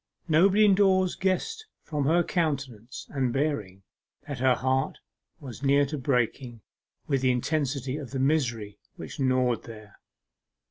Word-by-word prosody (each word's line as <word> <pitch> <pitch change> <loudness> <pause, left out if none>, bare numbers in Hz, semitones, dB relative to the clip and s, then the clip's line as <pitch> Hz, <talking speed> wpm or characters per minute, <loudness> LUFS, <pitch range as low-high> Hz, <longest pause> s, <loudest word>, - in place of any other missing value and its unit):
Nobody 190 +6 +5
indoors 190 -2 +3
guessed 440 - -2 0.2
from 150 -3 -2
her 170 +4 +3
countenance 135 - -3
and 130 -3 0
bearing 110 -9 -2 0.4
that 140 -4 -5
her 130 0 +3
heart 130 +1 -1 0.4
was 130 -5 -9
near 140 +1 +3
to 150 +2 -5
breaking 125 -2 -1 0.4
with 135 -3 0
the 130 - +2
intensity 135 +1 -1
of 140 -5 -7
the 135 - -5
misery 125 -7 0 0.2
which - - -9
gnawed 130 -2 +1
there. 110 -2 -12
135 Hz, 135 wpm, -27 LUFS, 125-155 Hz, 0.4 s, Nobody